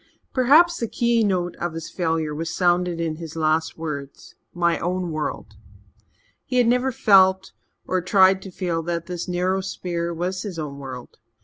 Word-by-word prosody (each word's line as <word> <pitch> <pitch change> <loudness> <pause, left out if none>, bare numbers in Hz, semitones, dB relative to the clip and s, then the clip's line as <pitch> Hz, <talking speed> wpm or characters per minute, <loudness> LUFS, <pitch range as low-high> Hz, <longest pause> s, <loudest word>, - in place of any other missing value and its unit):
Perhaps 300 +7 +5
the 230 - -1
keynote 210 -8 +1
of 175 -1 -3
his 165 0 -7
failure 160 -3 -1
was 165 +2 -4
sounded 175 -1 +1
in 160 -2 -2
his 165 -1 -8
last 160 0 0
words, 145 -4 -7 0.2
"my 170 -1 +1
own 180 -1 -2
world." 155 -1 -4 0.9
He 250 - -2
had 245 - +5
never 250 +3 +2
felt, 190 -6 +4 0.3
or 185 0 0
tried 190 +1 +4
to 190 - -9
feel, 175 -3 -2
that 170 0 -3
this 175 -2 -5
narrow 185 +2 0
sphere 175 -2 -3
was 180 +2 -3
his 200 -5 -6
own 145 -3 -5
world. 130 -3 -9
175 Hz, 165 wpm, -23 LUFS, 165-190 Hz, 0.9 s, Perhaps